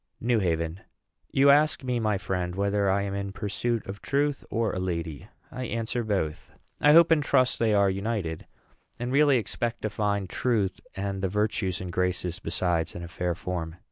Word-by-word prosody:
NEW 120 -1 +2
HAVEN. 85 -2 -1 0.5
You 140 +1 +6
ask 150 0 +3
me, 125 -2 0
my 110 -3 +1
friend, 90 -2 -3
whether 100 0 +1
I 100 +1 +2
am 100 -1 -3
in 100 0 -3
pursuit 105 +3 -2
of 100 +1 -7
truth, 145 0 0
or 115 -1 0
a - - -2
lady. 85 -2 -3 0.2
I 130 -1 -4
answer, 115 +1 -2
Both. 95 -8 -2 0.3
I 150 0 +6
hope 170 +1 +7
and 160 -2 +5
trust 130 -3 +2
they 110 -2 +3
are 100 -1 +4
united, 95 -4 -2 0.5
and 120 +1 -3
really 140 -1 +5
expect 120 +1 -3
to 110 - -1
find 100 -2 -1
Truth, 105 -2 0 0.2
and 95 0 -3
the 95 - 0
Virtues 105 -2 0
and 90 -1 -5
Graces 90 0 -1
besides, 85 -4 -1
in 85 - -6
a - - -6
fair 90 0 -2
form. 85 -2 -4
100 Hz, 185 wpm, -27 LUFS, 90-120 Hz, 0.5 s, hope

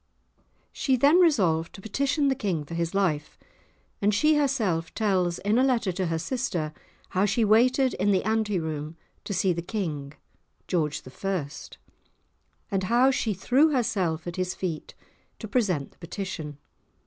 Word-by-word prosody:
She 265 - +1
then 285 +8 +5
resolved 180 - +3
to - - -10
petition 280 - 0
the 270 - +3
King 195 - -2
for 165 - -9
his 170 +2 -2
life, 160 -7 0 0.6
and 205 +1 +3
she 305 +8 +4
herself 230 - 0
tells 185 -5 +1
in 210 +4 +1
a - - +4
letter 240 -7 +2
to 185 0 -2
her 165 0 -1
sister 170 - -2 0.4
how 190 +2 +2
she 220 +3 +2
waited 250 +5 +4
in 205 - 0
the 190 -2 +2
ante 220 -3 0
room 155 0 -5 0.3
to - - -5
see 185 0 +2
the 170 - -3
King 155 -8 -4 0.5
(George 155 -5 -1 0.2
I.), 185 -7 -1 1.2
and 195 -1 0
how 245 +6 +4
she 225 -6 -1
threw 260 - +3
herself 190 - 0
at 175 0 -6
his 185 0 -1
feet 170 -5 -5 0.4
to 220 - -7
present 195 - 0
the - - -29
petition. 170 -4 -6
195 Hz, 160 wpm, -26 LUFS, 170-240 Hz, 1.2 s, then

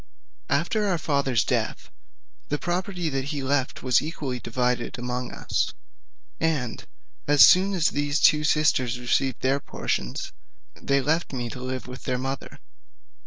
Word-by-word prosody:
After 180 +9 +1
our 185 -3 +1
father's 140 -6 +1
death, - - -2 0.6
the 145 - 0
property 180 +1 -2
that 135 -2 -2
he 145 -1 -3
left 135 -1 -1
was 130 -2 +4
equally 145 -5 -4
divided 125 +1 -1
among 125 0 -4
us, - - -2 0.6
and 150 -8 -1 0.4
as 145 -1 +8
soon 190 +2 +5
as 165 -3 +3
these 145 0 0
two 150 0 +5
sisters 130 -6 +2
received 130 +2 0
their 135 +2 +2
portions, 65 - -3 0.4
they 140 0 0
left 160 +3 0
me 120 -3 -3
to 125 - -8
live 130 0 -4
with 125 0 -9
their 125 -1 0
mother. 135 +1 -5
140 Hz, 145 wpm, -25 LUFS, 125-155 Hz, 0.6 s, as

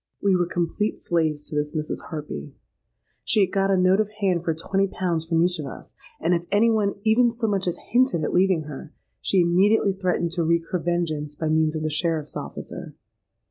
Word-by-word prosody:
"We 195 -2 +3
were 175 -1 +1
complete 175 +5 -1
slaves 155 -3 -1
to - - -7
this 150 +1 -2
Mrs. 155 -1 -3
Harpy. 145 - -6 0.7
She 215 - +3
had 190 - +2
got 195 0 +1
a 195 - +3
note 185 +2 +4
of 215 -1 +1
hand 185 -4 +1
for 165 -2 0
twenty 195 +4 0
pounds 175 -4 -2
from 165 0 +2
each 175 -1 +1
of 145 - -4
us; - - -10 0.3
and 180 - +1
if 170 -1 0
any 225 +3 +4
one 210 -3 +1
even 235 +2 +4
so 235 0 -3
much 195 -3 0
as 175 - -1
hinted 245 -8 +3
at - - -2
leaving 185 -3 +3
her, 150 +2 -9 0.3
she 190 - +3
immediately 195 +4 +3
threatened 180 -3 -1
to 170 -1 -1
wreak 165 +1 +2
her 180 - 0
vengeance 160 -4 -2
by 155 +1 -2
means 155 0 +2
of 155 - -3
the 155 - 0
sheriffs' 160 -1 -1
officer. - - -7
175 Hz, 210 wpm, -24 LUFS, 160-195 Hz, 0.7 s, note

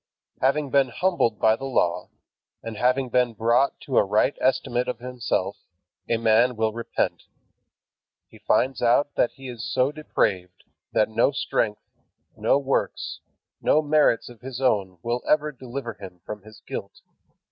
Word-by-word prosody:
Having 140 +1 +1
been 140 -1 +4
humbled 125 - 0
by 110 0 +4
the 135 - -7
Law, 105 -10 0 0.5
and 115 -1 -6
having 125 +3 +1
been 125 -2 +1
brought 115 +5 +2
to 135 - +2
a - - +5
right 105 +7 +2
estimate 125 -1 +1
of 125 -2 -2
himself, 120 -5 -2 0.5
a 115 - +2
man 115 +2 +3
will 110 -1 0
repent. 115 +1 -2 1.0
He - - -17
finds 130 -2 +1
out 125 +4 +3
that - - +1
he 135 0 -10
is 120 -3 -7
so 130 +3 +2
depraved, 95 - -2 0.3
that 110 - +3
no 115 +5 +3
strength, 110 -6 -1 0.5
no - - +2
works, 140 -1 -2 0.4
no 155 - +3
merits 150 -5 +3
of 120 -2 -13
his 130 -1 -6
own 100 -8 +1
will 120 +1 -1
ever 150 0 +3
deliver 130 -2 -6
him 95 -4 -11
from 105 -1 -6
his 110 +1 -15
guilt. - - -7
120 Hz, 155 wpm, -25 LUFS, 110-135 Hz, 1.0 s, a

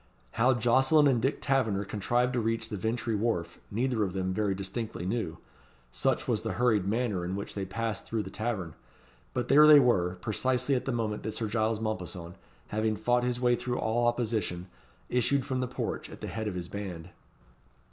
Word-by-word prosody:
How 125 +3 +3
Jocelyn 130 +6 +4
and 125 -4 +3
Dick 135 +4 0
Taverner 110 -8 +1
contrived 120 +6 0
to 125 - +1
reach 115 0 -1
the 105 - -3
Vintry 115 +3 -1
Wharf, 100 -6 -1
neither 120 +1 0
of 95 -3 -2
them 95 -1 -1
very 100 -1 0
distinctly 100 0 -5
knew, 95 -5 -2 0.5
such - - 0
was - - +1
the - - -3
hurried 110 -6 +2
manner 105 -4 0
in 90 +2 -3
which 100 - -5
they 100 -1 -3
passed 110 +2 -3
through 110 -2 -2
the - - -8
tavern; 105 -8 -3 0.6
but - - -1
there 150 +2 +7
they 150 -1 +10
were, 95 -9 +2
precisely 125 +7 0
at 125 - 0
the 135 - 0
moment 110 -3 -2
that 110 -1 -4
Sir 110 - -2
Giles 110 0 0
Mompesson, 90 -5 -4 0.4
having 110 0 0
fought 120 +3 +1
his 125 0 -1
way 120 -1 +3
through 120 +1 -3
all 120 +2 +1
opposition, 110 -7 -1 0.4
issued 125 +2 +1
from 130 -2 -2
the 130 - -1
porch - - -4
at - - -10
the - - -6
head 110 -1 -4
of 100 - -3
his 90 -1 -4
band. 90 -4 -6
110 Hz, 195 wpm, -29 LUFS, 100-125 Hz, 0.6 s, they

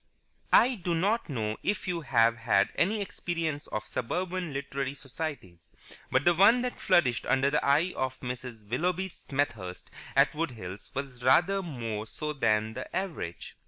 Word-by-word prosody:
I 255 +2 +6
do 175 -6 -2
not 200 +5 +1
know 110 -5 -2
if 205 -1 -1
you 175 -2 -1
have 115 -5 +3
had 110 -4 +3
any 205 +5 +1
experience 165 -6 -3
of 105 0 -4
suburban 175 +9 -2
literary 140 0 -3
societies, 135 - -6 0.4
but 130 +2 +2
the 175 - +6
one 220 +8 +6
that 250 - -4
flourished 155 - +3
under 135 +2 +3
the 150 - +1
eye 155 +6 +3
of 130 0 -2
Mrs. 125 -4 -6
Willoughby 180 - 0
Smethurst 115 - -4 0.2
at - - +5
Wood 165 +1 -1
Hills 95 -3 -8
was 135 -2 -5
rather 175 +10 +4
more 115 - -4
so 150 +6 -4
than 110 -5 +1
the 130 +2 -7
average. 160 - -4
140 Hz, 160 wpm, -29 LUFS, 115-175 Hz, 0.4 s, I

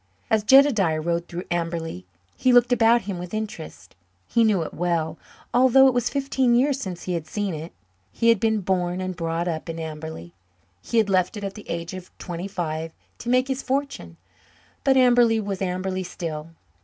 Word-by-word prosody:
As 220 -1 +3
Jedediah 215 - +5
rode 170 +2 -2
through 175 +1 -6
Amberley 165 - -3 0.3
he 255 - +2
looked 245 0 +5
about 235 0 +4
him 195 -3 -5
with 180 +3 -6
interest. 170 - -7 0.3
He 230 - +3
knew 205 -6 +2
it - - -7
well, 165 -2 -1 0.3
although 260 +2 +6
it 260 - +3
was 245 -1 0
fifteen 270 -3 +1
years 270 +2 +2
since 180 -3 -6
he 180 - -3
had 165 -2 -3
seen 205 -3 -2
it. 160 +2 -6 0.4
He 230 - +2
had 230 -3 +4
been 220 -1 +1
born 180 -1 -1
and 185 0 -3
brought 165 +1 -2
up 165 0 -3
in 165 - -4
Amberley; 155 - -7 0.5
he 235 - -2
had 220 -2 +4
left 185 +1 +1
it 205 - -6
at 195 -1 -4
the 210 - -12
age 170 +1 -4
of 185 -1 -8
twenty 175 +1 -5
five 160 -4 -4 0.3
to 235 - -5
make 255 +1 +3
his 265 -1 -2
fortune. 275 +2 -3 0.7
But 270 -1 +4
Amberley 240 -3 +5
was 200 -3 -4
Amberley 185 0 -2
still. 165 -3 -6
185 Hz, 190 wpm, -24 LUFS, 170-235 Hz, 0.7 s, although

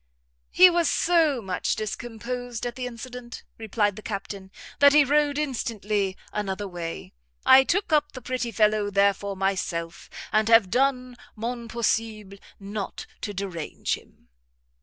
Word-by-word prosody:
"He 370 - +8
was 345 -2 +2
so 320 -8 +2
much 185 -2 -1
discomposed 240 +2 -5
at 240 - -3
the 250 0 -4
incident," 245 0 -9 0.2
replied 210 -2 0
the - - -7
Captain, 200 -2 -6 0.3
"that 285 0 +7
he 300 0 +7
rode 290 +1 +2
instantly 215 -8 -2 0.2
another 205 -1 -3
way. 175 -3 -6 0.3
I 265 0 +8
took 355 +3 0
up 295 -1 +2
the 255 - -8
pretty 250 -1 -2
fellow 210 -1 +2
therefore 200 0 +1
myself, 180 -3 -2 0.2
and 215 0 +2
have 225 -5 +6
done 255 -1 +1 0.2
mon 235 +1 -4
possible 220 -4 -2 0.2
not 200 0 -6 0.2
to 210 - -3
derange 185 -5 -4
him." - - -10
225 Hz, 140 wpm, -25 LUFS, 200-255 Hz, 0.3 s, He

